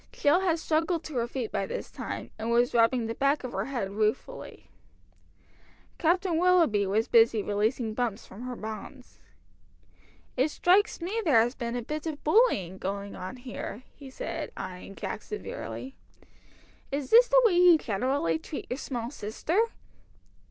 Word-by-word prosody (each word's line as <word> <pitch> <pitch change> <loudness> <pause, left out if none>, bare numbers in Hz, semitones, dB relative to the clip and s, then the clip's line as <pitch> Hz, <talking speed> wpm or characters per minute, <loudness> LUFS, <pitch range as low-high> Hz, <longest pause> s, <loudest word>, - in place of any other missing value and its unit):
Jill 295 +5 +3
had 355 -4 +1
struggled 325 +1 0
to 310 - -8
her 235 0 0
feet 240 -2 -4
by 195 - -1
this - - -5
time, - - -6
and 225 +1 -3
was 240 +1 +3
rubbing 235 +1 +3
the 225 - -3
back 275 +4 +1
of 255 - -5
her - - -2
head 240 -8 -3
ruefully. 215 - -3 1.3
Captain 350 0 +2
Willoughby 335 - +4
was 215 +4 +1
busy 225 -2 +4
releasing 215 +2 0
Bumps 235 -2 -2
from 200 - -12
her 250 0 -5
bonds. 220 +4 -8 1.2
"It 265 +4 +2
strikes 370 +5 +2
me 405 +7 -2
there 290 - +5
has 240 +2 0
been 235 -2 -4
a 245 - -3
bit 305 +6 -4
of 305 -2 -5
bullying 250 - +3
going 200 +1 -4
on 185 +5 -6
here," 245 -2 -7
he 280 -2 -12
said, 260 - -5
eyeing 185 +1 -7
Jack - - -5
severely. 270 -9 -7 1.0
"Is 280 -1 -3
this 485 +2 +8
the - - +6
way 430 - +5
you 350 -1 +7
generally 220 - 0
treat 285 - -7
your 250 - -1
small 240 -4 -4
sister?" 295 - -1
250 Hz, 160 wpm, -28 LUFS, 220-320 Hz, 1.3 s, this